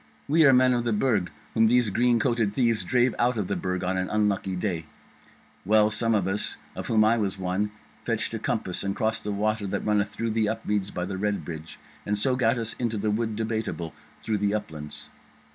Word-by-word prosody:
We 155 +1 +5
are - - +8
men 130 0 +5
of 120 -1 0
the 120 -2 0
Burg 105 -4 +1 0.2
whom 110 0 +4
these 120 -2 +3
green 120 +2 +3
coated 115 -5 +1
thieves 115 -4 +2
drave 125 -1 +2
out 120 0 +2
of 100 -4 -1
the - - -1
Burg 90 -1 -2
on 95 +1 0
an 95 - -2
unlucky 100 -3 0
day. 90 -4 -2 0.8
Well, 105 +1 +4
some 115 +1 +1
of 95 -3 +1
us, 95 +2 -2 0.2
of - - -5
whom 110 -1 +4
I 115 +2 +3
was 100 -2 -1
one, 95 +3 -1 0.3
fetched - - -1
a - - -2
compass 90 - -2
and 100 0 -2
crossed 110 +1 0
the 105 - -2
water 105 +1 -1
that - - -3
runneth 105 -1 +2
through 110 +2 -3 0.2
Upmeads 105 -3 -1
by 90 -2 -3
the 95 0 -4
Red 105 0 -1
Bridge, 80 -1 -7 0.3
and 105 0 -1
so 125 +5 +2
gat 120 -1 +2
us 115 -1 -2
into 115 -3 -1
the 105 +1 0
Wood 110 0 -1
Debateable 110 -7 -3 0.3
through 110 -2 -1
the 100 +1 +1
Uplands. 80 -8 -6
105 Hz, 210 wpm, -26 LUFS, 100-115 Hz, 0.8 s, are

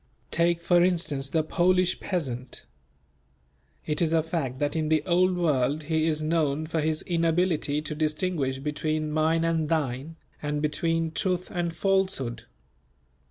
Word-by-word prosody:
Take 170 0 +2
for 175 0 +4
instance 160 -7 0
the 160 +1 +1
Polish 180 +3 +2
peasant. 130 -9 -4 1.2
It 150 +1 -1
is 165 -1 +2
a 160 -1 +3
fact 155 -6 -3
that 145 +2 -1
in 155 -1 0
the 155 -1 +2
Old 180 0 +3
World 150 -3 +1
he 160 +1 +1
is 155 -1 0
known 155 -2 +1
for 160 0 -1
his 155 0 -1
inability 165 -3 +1
to 155 - -4
distinguish 155 -3 -1
between 155 +2 -2
"mine 160 +2 +2
and 165 -2 0
thine," 150 -1 -1 0.3
and 150 0 -2
between 165 +2 0
truth 180 +2 -2
and 175 -2 -1
falsehood. 185 - 0
160 Hz, 145 wpm, -27 LUFS, 150-170 Hz, 1.2 s, for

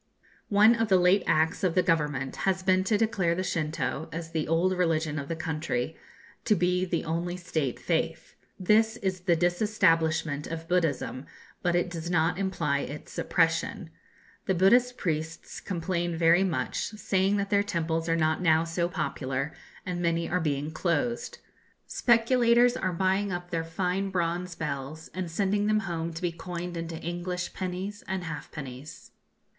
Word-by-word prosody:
One 210 +3 +6
of 225 -1 0
the 190 -2 +5
late 180 +2 +4
acts 160 +6 +2
of 180 -3 +1
the 185 - +4
government 150 -5 0
has 190 -1 0
been 185 0 +3
to 210 +1 +2
declare 195 -6 +1
the 185 - -1
Shintoo, 160 -2 -2
as 165 0 -6
the 160 -2 -1
old 170 +4 +2
religion 160 -4 0
of 140 - -6
the 165 - -2
country, 160 -4 -2 0.5
to 210 - +3
be 180 0 +1
the 175 -2 -2
only 170 +2 -2
State 155 -7 -2
faith. - - -2 0.3
This 220 +4 +3
is 190 -4 -2
the 175 -1 +2
disestablishment 165 -5 +1
of 165 0 -6
Buddhism, 160 -6 0 0.3
but 175 -1 +1
it 175 +1 +2
does 170 -1 -5
not 170 +1 +2
imply 165 -7 0
its - - -7
suppression. - - 0 0.6
The 190 - +2
Buddhist 245 +7 +4
priests 160 -3 -3
complain 175 -2 -2
very 170 +3 +5
much, 185 -4 -1 0.2
saying 195 0 +1
that 200 +1 -2
their 200 -1 +4
temples 165 -4 -1
are 165 - +3
not 160 +1 +1
now 160 -2 +4
so 170 +1 -1
popular, 135 -3 -2 0.3
and 180 -1 -3
many 170 -1 +1
are 180 - 0
being 145 -1 -1
closed. 185 +9 -1 0.5
Speculators 240 0 +4
are 185 - -1
buying 190 +3 +1
up 175 0 -5
their 165 -1 -1
fine 180 +4 -1
bronze 175 -1 -1
bells, 150 +1 -5
and 185 -2 -3
sending 200 +4 0
them 215 0 +3
home 170 -3 -3
to 165 +2 -8
be 175 - +1
coined 175 +1 -6
into 165 -1 -4
English 175 +2 -4
pennies 190 +3 -4
and 190 -1 -2
halfpennies. 150 -3 -8
175 Hz, 160 wpm, -28 LUFS, 160-190 Hz, 0.6 s, One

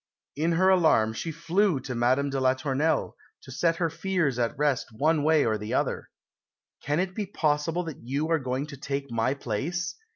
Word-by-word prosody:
In 160 +4 +1
her 185 +3 +4
alarm 160 -12 +4
she 165 +8 -4
flew 170 +1 +1
to 130 0 -5
Madame 130 +4 +1
de 135 - -1
la 130 0 +3
Tournelle, 140 +4 0 0.3
to 130 - -11
set 165 +6 +1
her 165 -1 -1
fears 165 -8 -1
at 115 -1 -1
rest 145 -3 +1
one 150 +7 +1
way 155 0 +3
or 110 -2 0
the 105 +1 -3
other. - - -1 0.7
"Can 150 +2 0
it 185 0 -1
be 205 0 -3
possible 160 0 0
that 160 -5 -8
you 140 +6 -2
are 165 - +3
going 130 +1 -2
to 145 -2 -10
take 140 0 -4
my 115 +4 0
place?" 165 - -3
145 Hz, 195 wpm, -27 LUFS, 130-165 Hz, 0.7 s, her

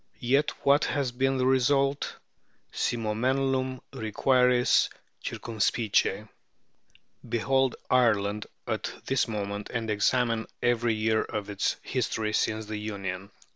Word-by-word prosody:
Yet 135 +5 +2 0.2
what 140 +1 +5
has 140 -3 -1
been 135 +2 +1
the 125 - +1
result? 135 +2 +2 0.6
Si 120 - -1
monumenlum 130 +4 0
requiris 125 +3 +3 0.3
circumspice. 110 -2 0 1.0
Behold 130 +2 +1
Ireland 105 -4 +2 0.2
at - - -2
this 135 -2 +1
moment, 100 -2 -4
and 115 -2 -2
examine 115 +1 +1 0.2
every 120 -1 +2
year 110 0 +2
of 105 -1 -4
its 100 - 0
history 110 -4 -1
since 110 0 0
the 110 0 -5
Union. 100 -2 -5
115 Hz, 110 wpm, -28 LUFS, 105-130 Hz, 1.0 s, what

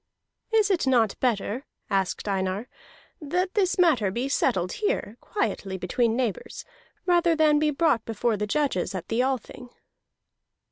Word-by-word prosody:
"Is 430 -2 +3
it 345 -7 +1
not 230 -6 +3
better," 240 +1 -1 0.2
asked 195 +1 -1
Einar, 190 +3 -1 0.5
"that 360 +5 -1
this 385 -2 +1
matter 305 - +4
be 240 +7 -2
settled 185 -10 +1
here 420 - -2
quietly, 200 - -2
between 225 +6 0
neighbors, 240 -6 -3 0.4
rather 345 -2 +3
than 305 -1 +4
be 305 0 +2
brought 295 -6 +2
before 225 +1 -1
the 210 0 -2
judges 270 -9 0
at 180 -2 -6
the 225 +2 +1
Althing?" 255 -1 -3
250 Hz, 140 wpm, -26 LUFS, 205-320 Hz, 0.5 s, matter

